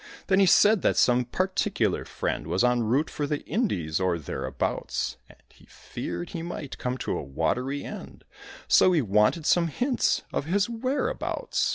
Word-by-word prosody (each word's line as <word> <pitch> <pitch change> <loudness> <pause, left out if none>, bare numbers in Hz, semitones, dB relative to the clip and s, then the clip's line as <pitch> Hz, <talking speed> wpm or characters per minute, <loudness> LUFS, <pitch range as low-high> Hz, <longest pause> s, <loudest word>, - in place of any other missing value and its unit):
Then 190 0 +4
he 195 - +5
said 205 +2 +5
that - - +1
some 125 0 +4
very 125 - -2 0.2
particular 190 - -1
friend 75 - -3
Was 90 +6 +1
en 125 -1 +3
route 125 +8 +1
for 145 - -3
the 150 0 -3
Indies, 90 - -1
or 90 -2 +1
thereabouts; 70 -3 -3
And - - -17
he - - -22
feared 85 0 -6
he 165 - -5
might 160 -5 -6
come 125 0 -2
to - - -3
a - - -3
watery 125 - -2
end, - - -9 0.4
So 185 - +5
he 160 -5 +2
wanted 105 - +2
some 170 0 +3
hints 245 - 0
of - - -1
his 195 +5 +1
whereabouts. 260 - -1
140 Hz, 175 wpm, -26 LUFS, -, 0.4 s, he